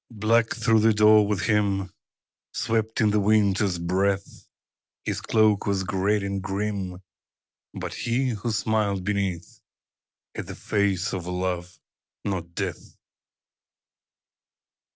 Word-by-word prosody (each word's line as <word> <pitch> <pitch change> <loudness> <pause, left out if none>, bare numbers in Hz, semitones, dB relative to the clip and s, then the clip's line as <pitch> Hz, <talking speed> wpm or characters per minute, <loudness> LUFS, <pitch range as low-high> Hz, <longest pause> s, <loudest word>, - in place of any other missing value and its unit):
_ 110 - -13
Black 115 +2 +2
through 115 -1 +3
the 110 0 +4
door 105 0 +6
with 100 -2 -1
him 100 -3 +1 0.6
Swept 110 0 -1
in 105 -2 +4
the 105 - +2
Winter's 100 -2 +2
breath; 95 +3 -1 0.6
His - - -2
cloak 110 -2 +2
was 100 -1 +1
great 100 +2 0
and 100 0 -2
grim 95 -1 -3 0.7
But - - -5
he, 130 +3 0
who 115 0 -3
smiled 105 -3 0
beneath, 95 -4 -3 0.7
Had - - -6
the - - -7
face 100 -2 0
of 90 -2 -4
Love 90 -1 -3 0.5
not 85 -4 -4
Death. - - -5
100 Hz, 120 wpm, -25 LUFS, 95-110 Hz, 0.7 s, door